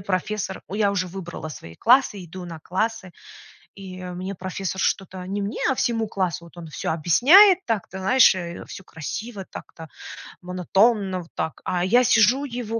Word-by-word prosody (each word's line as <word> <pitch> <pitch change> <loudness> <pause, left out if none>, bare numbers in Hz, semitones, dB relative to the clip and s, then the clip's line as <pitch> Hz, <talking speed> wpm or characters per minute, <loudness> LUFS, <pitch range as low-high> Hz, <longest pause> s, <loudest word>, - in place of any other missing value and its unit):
профессор 190 +1 -3
у, 195 - -8
я 205 -1 +2
уже 185 -2 -1
выбрала 175 -3 -7
свои 85 - -10
классы, 235 - +3
иду 180 +2 -9
на 165 -2 -8
классы, 190 +2 -3 0.6
и 185 -2 -9
мне 180 +2 -5
профессор 190 +1 -5
что-то- 190 -1 -2
не 200 +2 -3
мне, 200 +2 -4
а - - +1
всему 225 -3 0
классу- 185 -4 -2
вот 170 +1 -15
он 170 - -8
всё 155 - -4
объясняет 340 - +6
так-то, 200 -4 -3
знаешь, 245 +2 +5
э, 170 -2 -6
всё 190 - -10
красиво 195 +6 -7
так-то, 160 -1 -10 0.5
монотонно 190 +2 +1
вот 165 - -20
так, 160 - -3
а 175 -1 -1
я 240 +7 +4
сижу 240 +6 +4
его, 235 -3 -4
190 Hz, 170 wpm, -23 LUFS, 180-225 Hz, 0.6 s, объясняет